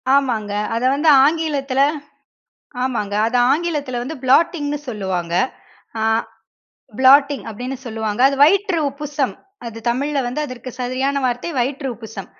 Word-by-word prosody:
ஆமாங்க. 235 Hz, -7 st, 0 dB, 0.2 s
அத 230 Hz, -, -2 dB
வந்து 305 Hz, +3 st, +2 dB, 0.2 s
ஆங்கிலத்தில 290 Hz, -4 st, 0 dB, 1.1 s
ஆமாங்க. 210 Hz, -6 st, -2 dB
அத 245 Hz, +2 st, 0 dB, 0.2 s
ஆங்கிலத்தில 290 Hz, -6 st, -2 dB
வந்து 310 Hz, +5 st, -6 dB
ப்ளாட்டிங்னு 290 Hz, +1 st, +2 dB
சொல்லுவாங்க. 190 Hz, -6 st, -3 dB, 0.7 s
அ. -, -, +1 dB, 1.0 s
ப்ளாட்டிங் 275 Hz, +2 st, +5 dB
அப்பிடின்னு 250 Hz, +5 st, -5 dB
சொல்லுவாங்க. 220 Hz, -1 st, -3 dB
அது 275 Hz, -, -2 dB
வயிற்று 385 Hz, +2 st, +2 dB
உப்புசம் 285 Hz, -1 st, -3 dB, 0.3 s
அது 230 Hz, -1 st, -7 dB
தமிழ்ல 280 Hz, +4 st, 0 dB
வந்து 250 Hz, +5 st, -3 dB
அதற்கு 255 Hz, -2 st, -8 dB
சரியான 255 Hz, +3 st, -1 dB
வார்த்தை 245 Hz, +6 st, -1 dB
வயிற்று 270 Hz, +3 st, -1 dB
உப்புசம். 220 Hz, -4 st, -9 dB
265 Hz, 120 wpm, -19 LUFS, 235-290 Hz, 1.1 s, ப்ளாட்டிங்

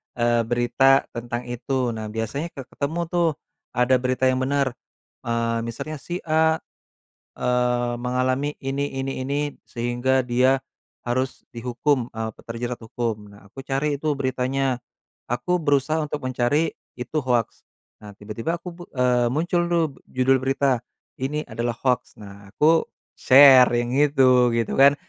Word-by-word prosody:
eee, 120 Hz, -1 st, +1 dB
berita 135 Hz, +3 st, +3 dB
tentang 120 Hz, +1 st, -5 dB
itu. 125 Hz, 0 st, -1 dB
Nah, 110 Hz, -1 st, -5 dB
biasanya 110 Hz, +8 st, -3 dB
ke 135 Hz, -, -6 dB
ketemu 150 Hz, +6 st, -3 dB
tuh, 175 Hz, -1 st, +2 dB, 0.5 s
ada 125 Hz, +1 st, +4 dB
berita 130 Hz, +1 st, -1 dB
yang 130 Hz, -, -1 dB
benar, 135 Hz, 0 st, +1 dB, 0.6 s
eee, 115 Hz, 0 st, 0 dB
misalnya 150 Hz, +6 st, -6 dB
si 175 Hz, +5 st, -6 dB
A, 160 Hz, 0 st, +3 dB, 0.8 s
eee, 125 Hz, -1 st, +1 dB
mengalami 130 Hz, +4 st, -1 dB
ini 140 Hz, +1 st, -2 dB
ini 135 Hz, 0 st, -3 dB
ini, 145 Hz, +1 st, -2 dB
sehingga 120 Hz, +2 st, 0 dB
dia 130 Hz, +2 st, +3 dB, 0.5 s
harus 130 Hz, +2 st, -2 dB
dihukum, 125 Hz, +2 st, -1 dB
eee, 110 Hz, 0 st, -3 dB
pe -, -, -18 dB
terjerat 120 Hz, +1 st, -4 dB
hukum. 110 Hz, -2 st, -4 dB
Nah, 100 Hz, -1 st, -17 dB
aku -, -, -18 dB
cari 140 Hz, +2 st, 0 dB
tuh 150 Hz, +1 st, 0 dB
beritanya, 130 Hz, -1 st, 0 dB, 0.5 s
aku 180 Hz, +9 st, 0 dB
berusaha 145 Hz, +1 st, +2 dB
untuk 150 Hz, 0 st, -4 dB
mencari 130 Hz, +5 st, +1 dB, 0.3 s
itu 125 Hz, +5 st, -3 dB
hoaks. 120 Hz, -3 st, -1 dB, 0.4 s
Nah, 105 Hz, -1 st, -10 dB
tiba-tiba 110 Hz, +9 st, -4 dB
aku 180 Hz, -, -8 dB
bu 175 Hz, -, -11 dB
eee, 125 Hz, -1 st, +2 dB
muncul 175 Hz, +4 st, +1 dB
tuh 170 Hz, -1 st, +3 dB, 0.3 s
judul 130 Hz, +1 st, +3 dB
berita, 135 Hz, -1 st, +1 dB, 0.4 s
"Ini 150 Hz, +3 st, -2 dB
adalah 120 Hz, 0 st, -2 dB
hoaks." 125 Hz, -2 st, 0 dB
Nah, 100 Hz, -1 st, -12 dB
aku 160 Hz, +2 st, +4 dB, 0.3 s
share 130 Hz, -1 st, +8 dB
yang 120 Hz, 0 st, -1 dB
itu, 130 Hz, -4 st, +4 dB
gitu 115 Hz, -2 st, -1 dB
kan, 140 Hz, +1 st, +7 dB
130 Hz, 145 wpm, -23 LUFS, 120-140 Hz, 0.8 s, share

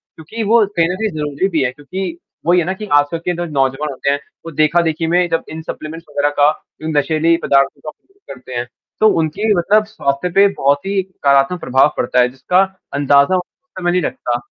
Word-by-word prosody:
क्योंकि 190 Hz, +9 st, -6 dB
वो 220 Hz, +1 st, +4 dB
कहीं 165 Hz, -1 st, +3 dB
न 180 Hz, -, -2 dB
कहीं 220 Hz, +3 st, -1 dB
ज़रूरी 150 Hz, +4 st, -1 dB
भी 160 Hz, -6 st, 0 dB
है। 125 Hz, -, 0 dB
क्योंकि 170 Hz, +6 st, -6 dB, 0.3 s
वही 175 Hz, +2 st, +4 dB
है 170 Hz, -, 0 dB
ना 190 Hz, -, -1 dB
कि 210 Hz, +3 st, -7 dB
आजकल 145 Hz, +3 st, +3 dB
के 175 Hz, +2 st, -2 dB
जो 175 Hz, +1 st, -3 dB
नौजवान 140 Hz, -1 st, -1 dB
होते 135 Hz, +1 st, -2 dB
हैं, 140 Hz, 0 st, +1 dB, 0.3 s
वो 165 Hz, -, -6 dB
देखा-देखी 160 Hz, +2 st, +1 dB
में 175 Hz, +1 st, +2 dB
जब 165 Hz, -, 0 dB
इन 160 Hz, +1 st, -7 dB
सप्लीमेंट्स 160 Hz, +1 st, -7 dB
वगैरह 145 Hz, 0 st, +1 dB
का 145 Hz, +1 st, +6 dB, 0.3 s
जो 155 Hz, -, -5 dB
नशीली 160 Hz, +3 st, +2 dB
पदार्थों 140 Hz, 0 st, +2 dB
का 155 Hz, -, -6 dB
उपयोग 390 Hz, -, -14 dB
करते 125 Hz, 0 st, -12 dB
हैं 120 Hz, 0 st, -2 dB, 0.3 s
तो 215 Hz, -, +5 dB
उनकी 185 Hz, +8 st, 0 dB
मतलब 210 Hz, +5 st, +3 dB
स्वास्थ्य 180 Hz, -7 st, -2 dB
पे 200 Hz, +1 st, +7 dB
बहुत 145 Hz, -6 st, 0 dB
ही 195 Hz, 0 st, 0 dB
नकारात्मक 145 Hz, -3 st, +1 dB
प्रभाव 130 Hz, 0 st, +2 dB
पड़ता 125 Hz, +1 st, +1 dB
है 125 Hz, 0 st, +4 dB
जिसका 135 Hz, +9 st, +1 dB, 0.3 s
अंदाज़ा 140 Hz, +4 st, +3 dB
उस 180 Hz, -, -2 dB, 0.4 s
समय 175 Hz, -1 st, 0 dB
नहीं 180 Hz, +1 st, +1 dB
लगता। 120 Hz, -6 st, -2 dB
160 Hz, 210 wpm, -17 LUFS, 140-180 Hz, 0.4 s, पे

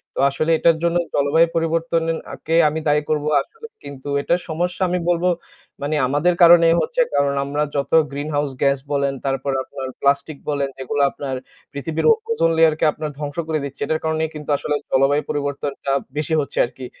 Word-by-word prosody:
তো -, -, -4 dB
আসলে 155 Hz, +4 st, -1 dB
এটার 165 Hz, 0 st, +3 dB
জন্য 170 Hz, 0 st, +2 dB, 0.2 s
জলবায়ু 145 Hz, +4 st, +3 dB
পরিবর্তনের 165 Hz, 0 st, 0 dB, 0.2 s
আকে 160 Hz, -, -3 dB
আমি 155 Hz, +2 st, -3 dB
দায়ী 150 Hz, 0 st, +3 dB
করব 150 Hz, -1 st, 0 dB, 0.2 s
আসলে। 455 Hz, -, -13 dB, 0.2 s
কিন্তু 140 Hz, -1 st, -10 dB
এটার 175 Hz, +4 st, 0 dB
সমস্যা 175 Hz, +4 st, -2 dB
আমি 180 Hz, -, 0 dB
বলব 175 Hz, 0 st, +1 dB, 0.6 s
মানে 150 Hz, +2 st, -1 dB
আমাদের 145 Hz, +7 st, +2 dB
কারণেই 170 Hz, -1 st, +7 dB
হচ্ছে। -, -, 0 dB
কারণ 140 Hz, 0 st, +2 dB
আমরা 145 Hz, +2 st, -1 dB
যত 140 Hz, -1 st, -2 dB, 0.2 s
গ্রিনহাউস 145 Hz, 0 st, -2 dB
গ্যাস 140 Hz, 0 st, +3 dB
বলেন, 140 Hz, -1 st, +1 dB
তারপর 135 Hz, 0 st, -1 dB
আপনার 135 Hz, -1 st, -7 dB
প্লাস্টিক 140 Hz, +1 st, +1 dB
বলেন, 140 Hz, -2 st, -1 dB
এগুলো 145 Hz, +2 st, -1 dB
আপনার 135 Hz, -2 st, -5 dB, 0.4 s
পৃথিবীর 155 Hz, +3 st, -3 dB
ও -, -, +8 dB, 0.2 s
ওজন 440 Hz, -, +2 dB
লেয়ারকে 160 Hz, -1 st, +4 dB
আপনার 155 Hz, 0 st, -5 dB
ধ্বংস 145 Hz, +1 st, -5 dB
করে 155 Hz, -1 st, 0 dB
দিচ্ছে। 140 Hz, -1 st, -8 dB
এটার 160 Hz, -, -1 dB
কারণেই 160 Hz, 0 st, 0 dB
কিন্তু 150 Hz, -1 st, -8 dB
আসলে 150 Hz, -, -2 dB, 0.2 s
জলবায়ু 135 Hz, +2 st, +3 dB
পরিবর্তনটা 140 Hz, -1 st, -3 dB, 0.3 s
বেশি 150 Hz, +1 st, -1 dB
হচ্ছে 140 Hz, -, -7 dB
আরকি। 130 Hz, +2 st, -10 dB
150 Hz, 175 wpm, -21 LUFS, 140-165 Hz, 0.6 s, ও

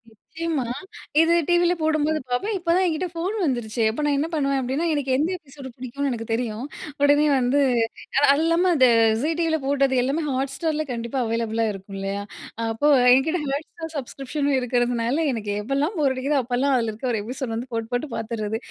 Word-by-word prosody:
நிச்சயமா. 320 Hz, +6 st, -4 dB, 0.6 s
இது 325 Hz, +1 st, +4 dB
டிவியில 350 Hz, 0 st, +3 dB
போடும்போது 310 Hz, 0 st, +1 dB
பார்ப்பேன். 395 Hz, -, -1 dB
இப்போ 340 Hz, -1 st, 0 dB
தான் 375 Hz, -, +3 dB
என்கிட்ட 345 Hz, +1 st, -1 dB
ஃபோன் 350 Hz, +5 st, -2 dB
வந்துருச்சே. 240 Hz, -4 st, -1 dB
அப்போ 265 Hz, +7 st, -4 dB
நான் 290 Hz, -1 st, +2 dB
என்ன 295 Hz, +3 st, 0 dB
பண்ணுவேன் 275 Hz, -3 st, +1 dB
அப்படின்னா, 265 Hz, +6 st, -1 dB
எனக்கு 285 Hz, -3 st, -1 dB
எந்த 305 Hz, +5 st, +1 dB
எபிசோடு 275 Hz, -5 st, -11 dB
பிடிக்கும்னு 260 Hz, +3 st, -3 dB
எனக்கு 230 Hz, -2 st, -5 dB
தெரியும், 230 Hz, 0 st, -2 dB, 0.4 s
உடனே 290 Hz, +1 st, +5 dB
வந்து 255 Hz, +3 st, +2 dB, 0.7 s
அது 280 Hz, +2 st, +5 dB
இல்லாம 335 Hz, +2 st, +3 dB
அந்த 260 Hz, -4 st, +6 dB, 0.3 s
விஜய் 295 Hz, +9 st, 0 dB
டிவியில 325 Hz, -1 st, +2 dB
போட்டது 275 Hz, -1 st, +2 dB
எல்லாமே 280 Hz, +6 st, -1 dB
Hotstarல 280 Hz, +4 st, -1 dB
கண்டிப்பா 235 Hz, +2 st, -3 dB
அவைலபுளா 230 Hz, 0 st, -1 dB
இருக்கும். 195 Hz, 0 st, -9 dB
இல்லையா? 195 Hz, +1 st, -3 dB, 0.5 s
அப்போ 225 Hz, +6 st, 0 dB, 0.3 s
என்கிட்ட 315 Hz, +6 st, +2 dB
Hotstar 315 Hz, +4 st, -4 dB
சப்ஸ்க்ரிப்ஷனும் 275 Hz, +1 st, -2 dB
இருக்கிறதுனால, 245 Hz, 0 st, 0 dB, 0.2 s
எனக்கு 215 Hz, -3 st, -3 dB
எப்போலாம் 280 Hz, -, -1 dB
போர் 275 Hz, -3 st, +3 dB
அடிக்குதோ 275 Hz, +3 st, +1 dB
அப்போலாம் 255 Hz, +3 st, +1 dB
அதில 230 Hz, -2 st, 0 dB
இருக்கற 245 Hz, +4 st, -3 dB
ஒரு 215 Hz, -, -1 dB
எபிசோடு 250 Hz, -1 st, -4 dB
வந்து 240 Hz, +3 st, -5 dB
போட்டு 225 Hz, -1 st, -3 dB
போட்டு 245 Hz, +5 st, -1 dB
பார்த்துடுறது. 220 Hz, -1 st, -3 dB
270 Hz, 170 wpm, -23 LUFS, 235-310 Hz, 0.7 s, அந்த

